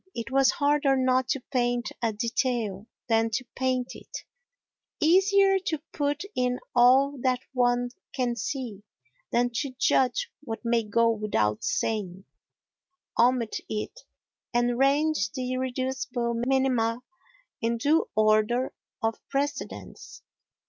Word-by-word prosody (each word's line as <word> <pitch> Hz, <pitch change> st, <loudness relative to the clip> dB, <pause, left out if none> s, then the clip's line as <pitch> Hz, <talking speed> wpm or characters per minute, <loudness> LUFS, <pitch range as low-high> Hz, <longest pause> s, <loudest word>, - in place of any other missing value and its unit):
It 235 Hz, +2 st, -5 dB
was 270 Hz, 0 st, +4 dB
harder 290 Hz, -4 st, +2 dB
not 255 Hz, 0 st, +2 dB
to 275 Hz, -, 0 dB
paint 245 Hz, -1 st, -1 dB
a 230 Hz, -2 st, +1 dB
detail 225 Hz, -2 st, -2 dB, 0.2 s
than 225 Hz, -1 st, +2 dB
to 230 Hz, +3 st, -2 dB
paint 255 Hz, -1 st, -1 dB
it, -, -, -9 dB, 0.8 s
easier 390 Hz, +4 st, +4 dB
to 315 Hz, -, 0 dB, 0.2 s
put 290 Hz, +2 st, -1 dB
in 250 Hz, 0 st, 0 dB, 0.2 s
all 265 Hz, +3 st, +5 dB
that 255 Hz, -1 st, +1 dB
one 245 Hz, -1 st, +1 dB, 0.2 s
can 245 Hz, -2 st, -1 dB
see 235 Hz, -3 st, -4 dB, 0.5 s
than 245 Hz, +1 st, +2 dB
to 255 Hz, +3 st, -3 dB
judge 275 Hz, -, +2 dB
what 235 Hz, -4 st, -7 dB
may 235 Hz, 0 st, +2 dB
go 230 Hz, +2 st, +2 dB
without 110 Hz, -, 0 dB
saying, 195 Hz, -4 st, -2 dB, 0.9 s
omit 240 Hz, -2 st, +3 dB
it 215 Hz, -, -4 dB, 0.6 s
and 240 Hz, 0 st, +2 dB
range 280 Hz, -5 st, +2 dB
the 255 Hz, -1 st, -3 dB
irreducible 255 Hz, -1 st, -2 dB
minima 250 Hz, -3 st, +1 dB, 0.6 s
in 230 Hz, +1 st, 0 dB
due 295 Hz, +7 st, +2 dB
order 215 Hz, +4 st, +2 dB, 0.3 s
of 225 Hz, 0 st, 0 dB
precedence. 285 Hz, +1 st, -4 dB
250 Hz, 120 wpm, -27 LUFS, 230-270 Hz, 0.9 s, all